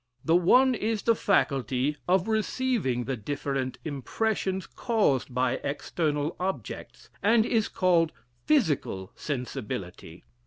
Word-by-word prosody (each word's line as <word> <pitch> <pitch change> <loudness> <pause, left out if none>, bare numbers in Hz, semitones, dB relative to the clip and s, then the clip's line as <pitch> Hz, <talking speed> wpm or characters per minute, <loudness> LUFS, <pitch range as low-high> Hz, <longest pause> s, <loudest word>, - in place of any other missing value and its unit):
The 165 - +4
one 250 +10 +5
is 220 -2 -1
the 230 - +4
faculty 140 - +1
of 185 +1 +3
receiving 220 - 0
the 135 +2 -2
different 135 +1 -3
impressions 190 - -1
caused 200 - 0
by 125 0 +1
external 150 +1 -1
objects, 180 - -5
and 220 +2 +4
is 225 -3 +1
called 170 -3 +2 0.3
Physical 150 - +1
Sensibility. 105 - -5
160 Hz, 110 wpm, -27 LUFS, 130-210 Hz, 0.3 s, one